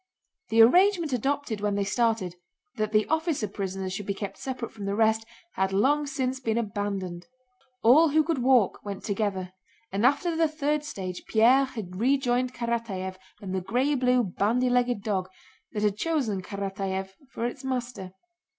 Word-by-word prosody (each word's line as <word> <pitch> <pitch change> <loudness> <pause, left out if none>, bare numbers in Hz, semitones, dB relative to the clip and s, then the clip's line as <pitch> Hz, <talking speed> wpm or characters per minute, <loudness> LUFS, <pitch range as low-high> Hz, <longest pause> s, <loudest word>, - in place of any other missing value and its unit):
The 225 0 +7
arrangement 350 - +4
adopted 260 -3 -1
when 205 -1 0
they 200 - +1
started, 220 -3 0 0.4
that 215 -1 -1
the 215 0 +3
officer 320 -7 0
prisoners 190 -1 -4
should 200 +1 -5
be 200 - -1
kept 195 -1 -6
separate 255 -3 -5
from 210 -3 -8
the 200 0 -1
rest, 220 0 +2 0.3
had 190 0 0
long 285 +9 +2
since 265 -2 -2
been 225 -3 -1
abandoned. 200 -5 -3 0.6
All 300 +8 +7
who 310 +2 +4
could 320 -3 -1
walk 250 -5 +3
went 200 -2 -6
together, 195 -3 -2 0.4
and 200 +3 -1
after 305 +6 +3
the 325 0 +3
third 300 -1 -1
stage 185 - -6
Pierre 245 +5 +5
had 210 -9 -7
rejoined 255 0 +2
Karatáev 230 -6 -3 0.3
and 190 -1 -4
the 190 - -1
gray 250 +10 +1
blue 250 -2 +3
bandy 230 +6 +1
legged 245 -4 +1
dog 190 -4 -1 0.4
that 210 - -3
had 205 -1 +1
chosen 255 - 0
Karatáev 195 0 -4 0.2
for 235 - -4
its 255 +3 -4
master. 245 -8 -4
225 Hz, 165 wpm, -27 LUFS, 195-260 Hz, 0.6 s, The